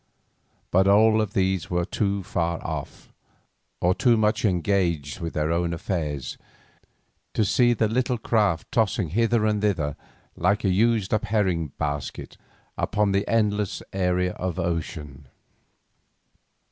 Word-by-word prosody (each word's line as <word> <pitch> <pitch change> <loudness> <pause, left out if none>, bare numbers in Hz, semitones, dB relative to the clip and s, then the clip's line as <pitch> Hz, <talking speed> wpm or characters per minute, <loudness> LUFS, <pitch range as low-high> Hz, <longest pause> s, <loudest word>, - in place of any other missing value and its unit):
But 95 +2 +4
all 110 +2 +5
of 105 -2 -3
these 95 -2 0
were 90 -1 0
too 100 0 -1
far 85 -2 -1
off, - - -6 0.7
or 90 +1 +3
too 120 +3 +3
much 110 0 +1
engaged 90 - 0
with 85 -1 -4
their 75 +1 0
own 85 0 0
affairs 75 -6 -3 1.0
to 110 - +2
see 120 +4 +3
the 110 -1 +1
little 125 +2 0
craft 105 -7 0
tossing 105 -6 +1
hither 115 +4 +2
and 105 -1 +1
thither 85 -9 0 0.4
like 100 +4 +1
a 100 - +2
used 110 +1 +2
up 110 - +1
herring 95 -7 0
basket 75 -2 -4 0.4
upon 105 -1 +1
the 100 +1 0
endless 105 -3 0
area 90 -1 +1
of 90 -2 -4
ocean. 80 -5 -4
95 Hz, 135 wpm, -25 LUFS, 85-105 Hz, 1.0 s, all